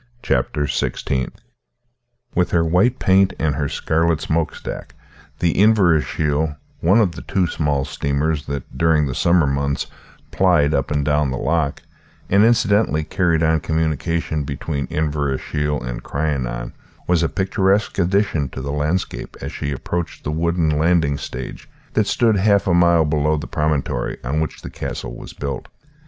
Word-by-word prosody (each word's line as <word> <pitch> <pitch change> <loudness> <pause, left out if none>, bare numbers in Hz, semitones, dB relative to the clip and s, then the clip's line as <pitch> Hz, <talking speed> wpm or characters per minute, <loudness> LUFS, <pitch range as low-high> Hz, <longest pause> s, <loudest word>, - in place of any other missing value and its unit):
CHAPTER 70 +3 0
XVI 65 -2 -1 1.0
With 90 - +1
her 85 -1 +2
white 95 +10 +3
paint 95 -2 +3
and 75 -2 0
her 70 0 -1
scarlet 80 0 +1
smokestack, 80 0 -3 0.4
the 85 -2 +1
Inverashiel 80 - +2 0.2
one 95 +7 +4
of 100 -6 +3
the - - -9
two 95 -2 0
small 75 -5 0
steamers 70 +2 -1
that 70 -3 -5
during 80 +1 +3
the 65 - -2
summer 85 +3 +3
months 70 0 -1 0.5
plied 85 -6 +3
up 70 -2 0
and 75 -1 0
down 75 -1 +2
the 65 - -2
loch, 80 -2 -1 0.5
and 100 +2 +6
incidentally 105 -8 +3
carried 80 0 +1
on 80 0 +3
communication 80 0 -1
between 70 +1 -3
Inverashiel 75 -1 -1
and - - -5
Crianan 65 -5 -3 0.3
was 85 -2 +2
a 85 - +1
picturesque 95 +1 +1
addition 90 -6 +1
to 65 - -7
the 70 - -3
landscape, 75 +5 -2
as - - -5
she 70 - -4
approached 85 +5 -4
the 75 - -2
wooden 80 -1 +1
landing 80 -3 +2
stage - - -7 0.2
that - - +2
stood 115 -3 +3
half 100 0 +3
a 95 - +2
mile 85 -2 +4
below 75 +1 +1
the 75 - -5
promontory 75 -5 -1
on 70 +5 -1
which 80 - -4
the - - -7
castle - - -5
was - - -10
built. 70 -2 -5
80 Hz, 150 wpm, -20 LUFS, 70-85 Hz, 1.0 s, and